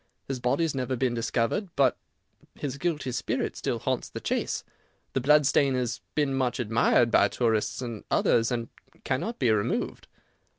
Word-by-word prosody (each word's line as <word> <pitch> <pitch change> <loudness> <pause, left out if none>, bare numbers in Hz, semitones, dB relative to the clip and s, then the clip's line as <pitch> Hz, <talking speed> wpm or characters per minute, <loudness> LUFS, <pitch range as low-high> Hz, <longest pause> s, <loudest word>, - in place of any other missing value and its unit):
His 135 -2 -3
body 125 +7 +1
has 160 - 0
never 130 -1 -1
been 125 0 0
discovered, 115 - -1
but 135 -3 +4 0.6
his 140 -1 -5
guilty 155 -6 -1
spirit 125 +1 -2
still - - -2
haunts - - -2
the - - -6
Chase. - - -2 0.5
The 135 - 0
blood 150 +3 +5
stain 135 -1 +3
has 125 -2 -2
been 145 -3 +1
much 130 -1 0
admired 115 +1 +3
by - - +5
tourists 115 +1 0
and 115 -4 -6
others, 115 +1 +3
and 115 -1 -2 0.3
cannot 215 - -2
be 125 -4 +2
removed." 105 -2 -1
130 Hz, 165 wpm, -27 LUFS, 120-140 Hz, 0.6 s, blood